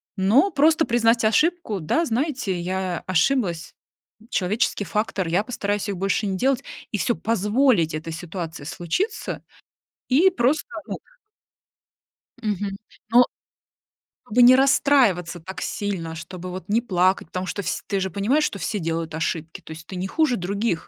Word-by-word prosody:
но 230 Hz, -, +4 dB
просто 315 Hz, +2 st, +4 dB
признать 230 Hz, -1 st, +3 dB
ошибку: 300 Hz, -, +1 dB
"Да, 320 Hz, -, +1 dB
знаете, 250 Hz, -, -1 dB
я 185 Hz, 0 st, -2 dB
ошиблась, 180 Hz, -1 st, +1 dB, 0.6 s
человеческий 205 Hz, +1 st, 0 dB
фактор, 200 Hz, -1 st, -1 dB
я 180 Hz, +5 st, +1 dB
постараюсь 205 Hz, -3 st, -2 dB
их 200 Hz, -3 st, -3 dB
больше 195 Hz, +3 st, 0 dB
не 195 Hz, -2 st, -1 dB
делать", 260 Hz, +4 st, +1 dB, 0.3 s
и 210 Hz, -, -1 dB
всё, 235 Hz, +5 st, 0 dB
позволить 210 Hz, -, +2 dB
этой 155 Hz, +1 st, -4 dB
ситуации 165 Hz, -2 st, -6 dB
случиться 175 Hz, -, -3 dB, 0.6 s
и 315 Hz, +9 st, +5 dB
просто, 295 Hz, -, +1 dB, 0.2 s
ну -, -, -4 dB, 1.5 s
Мгм. 205 Hz, -2 st, -2 dB, 0.3 s
Но. 245 Hz, +1 st, +7 dB, 1.0 s
Чтобы 245 Hz, +2 st, +3 dB
не 250 Hz, +1 st, +9 dB
расстраиваться 245 Hz, -, +3 dB
так 185 Hz, +4 st, -8 dB
сильно, 175 Hz, -6 st, -3 dB
чтобы 180 Hz, +2 st, -8 dB
вот 180 Hz, -1 st, -7 dB
не 225 Hz, +3 st, +2 dB
плакать, 185 Hz, -5 st, +1 dB
потому 185 Hz, +2 st, -4 dB
что 200 Hz, -, -3 dB
вс 180 Hz, -, -3 dB
ты 200 Hz, -2 st, -1 dB
же 190 Hz, 0 st, -1 dB
понимаешь, 225 Hz, -, +1 dB
что 200 Hz, -, -1 dB
все 210 Hz, +1 st, -2 dB
делают 165 Hz, -1 st, -3 dB
ошибки, 160 Hz, 0 st, -3 dB
то -, -, -16 dB
есть 160 Hz, +1 st, -9 dB
ты 190 Hz, -, -8 dB
не 185 Hz, +1 st, -3 dB
хуже 305 Hz, 0 st, +2 dB
других. 200 Hz, +3 st, -1 dB
200 Hz, 150 wpm, -23 LUFS, 180-245 Hz, 1.5 s, не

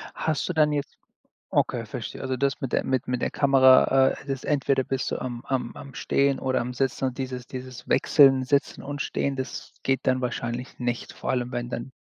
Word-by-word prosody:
Hast 155 Hz, -2 st, -1 dB
du 180 Hz, -, -2 dB
dann 155 Hz, -1 st, +3 dB
jetzt 145 Hz, -1 st, -3 dB, 0.5 s
okay, -, -, 0 dB
verstehe. -, -, -6 dB
Also 130 Hz, -1 st, -2 dB
das 140 Hz, +1 st, 0 dB
mit 135 Hz, -, -3 dB
der -, -, +1 dB
mit 130 Hz, -2 st, -1 dB
mit 125 Hz, -1 st, -1 dB
der -, -, 0 dB
Kamera, 135 Hz, -1 st, +5 dB
äh, -, -, -4 dB
das 135 Hz, -1 st, -3 dB
entweder 135 Hz, -2 st, +1 dB
bist 135 Hz, 0 st, -2 dB
du -, -, -2 dB
am 120 Hz, -2 st, -5 dB
am 130 Hz, -3 st, -2 dB
am 140 Hz, -2 st, -10 dB
Stehen 140 Hz, 0 st, +1 dB
oder 130 Hz, -1 st, 0 dB
am 125 Hz, +1 st, -4 dB
Sitzen 135 Hz, +1 st, -1 dB
und 130 Hz, -1 st, -3 dB
dieses 130 Hz, -2 st, -5 dB
dieses 130 Hz, -1 st, -8 dB
Wechseln, 135 Hz, -3 st, +5 dB
Sitzen 140 Hz, +2 st, 0 dB
und 145 Hz, +1 st, -4 dB
Stehen, 140 Hz, -2 st, -1 dB
das 130 Hz, 0 st, -5 dB
geht 135 Hz, -1 st, 0 dB
dann 130 Hz, 0 st, +1 dB
wahrscheinlich 120 Hz, 0 st, -4 dB
nicht, 120 Hz, -1 st, -3 dB
vor -, -, -3 dB
allem 125 Hz, 0 st, -1 dB
wenn 120 Hz, 0 st, -3 dB
dann 125 Hz, +2 st, -5 dB
130 Hz, 210 wpm, -26 LUFS, 125-135 Hz, 0.5 s, Kamera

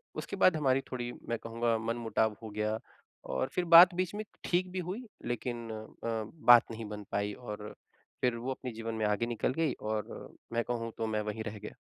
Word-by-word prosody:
उसके -, -, -4 dB
बाद 185 Hz, -, +5 dB
हमारी 135 Hz, -2 st, +3 dB
थोड़ी, 120 Hz, -1 st, -3 dB, 0.2 s
मैं 115 Hz, -, 0 dB
कहूँगा, 115 Hz, 0 st, 0 dB
मनमुटाव 115 Hz, -1 st, 0 dB
हो 110 Hz, -, -5 dB
गया 105 Hz, +1 st, -1 dB, 0.6 s
और 65 Hz, 0 st, 0 dB
फिर 180 Hz, -, 0 dB
बात 175 Hz, +1 st, +10 dB
बीच 185 Hz, +1 st, -1 dB
में 215 Hz, -, -3 dB, 0.2 s
ठीक 180 Hz, +1 st, +1 dB
भी 185 Hz, -, -3 dB
हुई, 240 Hz, +6 st, -4 dB, 0.2 s
लेकिन 120 Hz, -1 st, -3 dB
अ, 110 Hz, +1 st, -4 dB, 0.2 s
बात 120 Hz, -1 st, +8 dB
नहीं 110 Hz, 0 st, -6 dB
बन 105 Hz, -1 st, -6 dB
पाई 100 Hz, 0 st, 0 dB
और 105 Hz, -3 st, -7 dB, 0.5 s
फिर 125 Hz, -2 st, +2 dB
वो 125 Hz, +3 st, -3 dB
अपने 130 Hz, -1 st, -5 dB
जीवन 115 Hz, 0 st, -5 dB
में 110 Hz, -1 st, 0 dB
आगे 105 Hz, +2 st, +1 dB
निकल 120 Hz, +2 st, 0 dB
गई 165 Hz, 0 st, +1 dB
और 110 Hz, -1 st, -4 dB, 0.2 s
मैं 120 Hz, -, +2 dB
कहूँ, 115 Hz, -1 st, -3 dB
तो 115 Hz, -, -1 dB
मैं 110 Hz, -1 st, 0 dB
वहीं 105 Hz, +1 st, -4 dB
रह 110 Hz, -1 st, -6 dB
गया। 105 Hz, -, -8 dB
115 Hz, 200 wpm, -31 LUFS, 110-125 Hz, 0.6 s, बात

